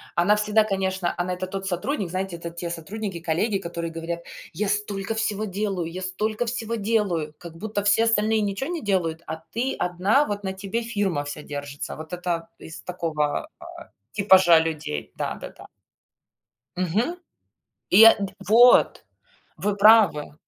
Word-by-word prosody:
Она 185 +5 +4
всегда, 210 +1 +2
конечно, 190 -3 -1
она 180 +1 -1
это 185 +1 -4
тот 195 +1 -5
сотрудник, 195 - -2
знаете, 185 0 -3
это 170 0 -6
те 170 0 -5
сотрудники, 190 +3 -5
коллеги, 175 +6 0
которые 170 -2 -5
говорят: 165 +1 -5 0.3
"Я 210 - -2
столько 205 +1 -2
всего 215 -1 -1
делаю, 195 -4 -2
я 180 +2 -7
столько 210 +5 -2
всего 230 -1 -3
делаю". 200 -8 0
Как 170 -2 -10
будто 205 +2 -4
все 205 +2 +4
остальные 220 -1 +2
ничего 205 +8 -2
не 345 -2 -3
делают, 170 -5 0
а 160 +1 -6
ты 250 +4 -1
одна, 190 +11 +2
вот 205 -3 -4
на 190 - -2
тебе 195 +4 -3
фирма 200 -10 -1
вся 145 +1 -6
держится. 145 -1 -6
Вот 155 0 -10
это 175 -2 -3
из 160 - -10
такого, 160 - -2
а, - - -12 0.5
типажа 190 -5 +6
людей, 150 - -4
да-да-да. - - -6 1.1
Мгм. 205 - 0 0.7
И, 215 +4 +9
а, 225 - +10
д 200 -2 -4 0.2
вот, 240 +3 +6 0.5
вы 205 0 -1
правы. 200 -9 +5
190 Hz, 155 wpm, -24 LUFS, 170-215 Hz, 1.1 s, а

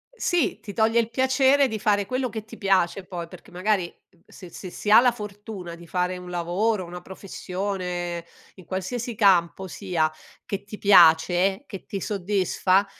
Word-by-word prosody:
Sì, 350 - 0
ti 205 - -9
toglie 225 +1 +3
il 230 -1 0
piacere 265 +2 +3
di 220 -2 -4
fare 205 -2 +2
quello 255 +4 -1
che 220 -1 -6
ti 220 +1 -12
piace 195 -2 +1
poi, 175 -2 -6
perché 180 +1 -14
magari, 185 +1 0 0.3
uhm, 170 - -29
se 180 - -12
se 185 +2 -8
si 210 - -5
ha 215 - +10
la 245 0 +4
fortuna 205 -5 -8
di 170 0 -14
fare 180 +1 -1
un 180 0 -9
lavoro, 185 +5 0
una 175 +1 -8
professione, 180 -2 -4 0.3
in 185 - -15
qualsiasi 225 +5 -4
campo 190 -2 +3
sia, 175 -5 -1 0.3
che 200 - -4
ti 210 0 -8
piace, 180 - +5
che 195 -7 -9
ti 195 -2 -5
soddisfa, 195 -1 +1
195 Hz, 170 wpm, -25 LUFS, 180-215 Hz, 0.3 s, ha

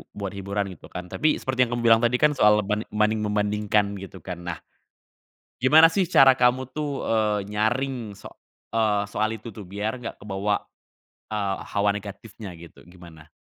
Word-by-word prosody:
buat 100 -2 -4
hiburan 100 0 -3
gitu 90 - -13
kan? 90 0 -8
Tapi 155 0 +2
seperti 130 -1 0
yang 120 - -3
kamu 120 - -3
bilang 115 -1 +6
tadi 120 +1 +2
kan 150 +4 +4
soal 105 -6 +4
banding 105 +1 0
membandingkan 105 -1 0
gitu 95 -3 -11
kan 90 -2 -6
nah. 85 - -4 1.0
Gimana 160 +6 +7
sih 185 -1 +1
cara 135 -6 +7
kamu 125 +1 +1
tuh, 150 0 -3 0.2
eee, 110 -2 +1 0.2
nyaring 115 0 -1
so - - -12 0.5
eee, 105 -3 +2
soal 110 +2 -1
itu 110 0 -10
tuh 105 - -8
biar 105 +6 -4
nggak 115 - -6
kebawa, 100 0 -2 0.6
eee, 100 -3 -2
hawa 100 0 +1
negatifnya 100 -1 -8
gitu 85 0 -14
gimana? 85 -3 -15
105 Hz, 165 wpm, -24 LUFS, 100-120 Hz, 1.0 s, Gimana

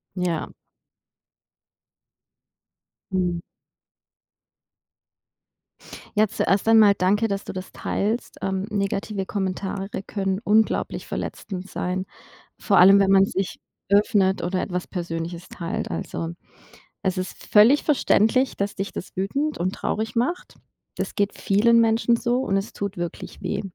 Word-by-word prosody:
Ja. 175 -3 -2 2.6
Mhm. 180 -2 0 2.7
Ja, 215 0 +4
zuerst 195 +5 0
einmal 220 -3 +7
danke, 205 +5 +2
dass 200 -1 -3
du - - -7
das 185 0 -7
teilst. 220 +4 -2
Ähm, 190 +1 -1
negative 200 0 -2
Kommentare 195 0 -3 0.2
können 195 -1 -2
unglaublich 220 +1 +1
verletzend 190 -1 -5
sein, 185 +1 -2 0.5
vor 200 -4 +2
allem, 195 +2 +8
wenn 195 0 +3
man 195 0 +6
sich 190 -1 -3 0.3
öffnet 200 -2 +3
oder 180 +2 -1
etwas 180 -1 -3
Persönliches 170 -1 -5
teilt. 170 -1 -4
Also, 165 - -4 0.7
es 185 -1 0
ist 185 - -5
völlig 225 +8 +6
verständlich, 255 -3 +2
dass 200 0 -1
dich 195 0 -4
das 190 - -8
wütend 280 +11 -1
und 185 +2 -1
traurig 220 +2 -3
macht. 255 +10 -1 0.4
Das - - -3
geht 205 -1 -1
vielen 230 +4 +4
Menschen 230 +1 +3
so 240 +1 0
und 195 -7 0
es 195 +3 -4
tut 200 -2 -4
wirklich 175 -1 -6
weh. - - -2
195 Hz, 125 wpm, -24 LUFS, 185-215 Hz, 2.7 s, allem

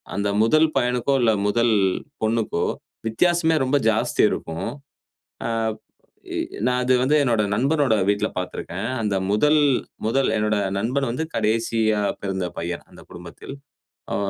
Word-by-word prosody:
அந்த 100 +1 0
முதல் 155 +8 +4
பையனுக்கோ 125 +2 +1
இல்ல 115 -2 +4 0.2
முதல் 115 +2 +2 0.5
பொண்ணுக்கோ 110 -5 0 0.4
வித்தியாசமே 165 +7 +2
ரொம்ப 130 +2 +2
ஜாஸ்தி 110 0 +1
இருக்கும். 80 0 -4 0.8
ஆ - - -1 0.9
எ - - -1 0.2
எ - - -8
நா 125 - +3
அது 130 +1 +3
வந்து 135 +4 +2
என்னோட 115 -5 +2
நண்பனோட 140 +1 +2
வீட்ல 100 0 +1
பார்த்திருக்கேன். 90 +3 -4
அந்த 105 -2 0 0.2
முதல் 150 +9 +3 0.5
முதல் 135 +4 +2
"என்னோட 105 0 +1 0.2
நண்பன் 130 +6 0
வந்து 130 +7 -2
கடேசியா 110 -1 +1 0.2
பிறந்த 95 -2 -2
பையன் 85 0 -4
அந்தக் - - -16
குடும்பத்தில்." 85 +9 -10 0.6
ஆ - - 0
115 Hz, 135 wpm, -23 LUFS, 105-130 Hz, 0.9 s, முதல்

